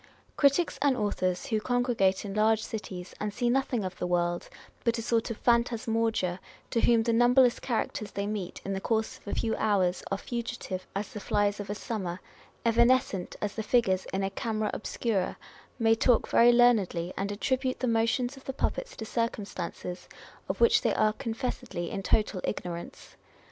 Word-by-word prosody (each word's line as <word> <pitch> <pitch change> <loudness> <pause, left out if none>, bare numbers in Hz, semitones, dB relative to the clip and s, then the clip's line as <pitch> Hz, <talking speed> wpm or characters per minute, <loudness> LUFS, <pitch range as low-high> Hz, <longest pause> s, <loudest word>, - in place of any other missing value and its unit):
Critics 285 +4 +3
and 280 -3 +3
authors, 185 -4 -1
who 220 -2 0
congregate 235 -6 +1
in 195 - -5
large 215 +1 +3
cities, 185 -5 -6
and 210 0 -2
see 240 +3 0
nothing 255 -4 0
of 185 0 -6
the 180 - -1
world 175 0 0 0.3
but 235 0 +1
a - - -2
sort 230 -1 +1
of 230 - -4
phantasmagoria, 225 -5 +1 0.3
to 230 - +1
whom 230 -2 +4
the 230 0 +1
numberless 245 +1 +5
characters 220 -3 -2
they 200 0 -3
meet 205 -4 -4
in 195 - -2
the 195 - -3
course 220 0 -1
of - - -24
a - - -2
few 225 -1 0
hours 185 -4 +1
are 195 - 0
fugitive 235 -5 -5
"as 205 +6 -3
the 210 - -5
flies 205 0 0
of 205 - -6
a 205 - -2
summer," 190 -6 -4 0.5
evanescent 235 -5 +3
as 205 - -1
the 220 - -3
figures 200 -5 +2
in 195 +1 -1
a 195 - -1
camera 215 +1 -2
obscura, 205 -4 -1 0.4
may 225 -2 +4
talk 230 +1 +3
very 240 +1 +6
learnedly, 210 -8 +3
and 200 +1 -2
attribute 255 +5 -1
the 255 - 0
motions 230 +3 +1
of 270 - -15
the 270 - -3
puppets - - -2
to 220 - -6
circumstances 200 -6 -4 0.4
of - - -2
which 460 -1 +5
they - - +1
are 215 0 +3
confessedly 225 -6 -4
in 200 - -3
total 205 -1 +1
ignorance. 170 -1 -5
220 Hz, 180 wpm, -29 LUFS, 195-240 Hz, 0.5 s, very